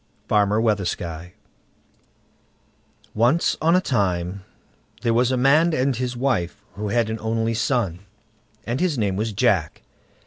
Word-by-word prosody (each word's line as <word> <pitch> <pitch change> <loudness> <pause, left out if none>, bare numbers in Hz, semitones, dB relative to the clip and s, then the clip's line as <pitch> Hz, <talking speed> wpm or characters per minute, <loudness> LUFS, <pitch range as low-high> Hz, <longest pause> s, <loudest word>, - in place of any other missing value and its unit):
FARMER 105 0 +2
WEATHERSKY 90 -5 -2 1.8
Once 120 +10 +2
on 165 +3 +4
a 185 - +4
time 95 - -1 0.6
there 115 -2 +2
was 120 +2 +2
a 130 - +1
man 155 +6 +4
and 130 +1 +1
his 125 0 -3
wife, 105 -7 -1
who 105 +1 -5
had 115 +1 +1
an 110 - -4
only 115 +1 -1
son, 110 -7 -1 0.7
and 120 +2 -2
his 175 -5 0
name 100 -4 0
was 110 +3 -2
Jack. 100 -7 0
115 Hz, 135 wpm, -22 LUFS, 100-125 Hz, 1.8 s, on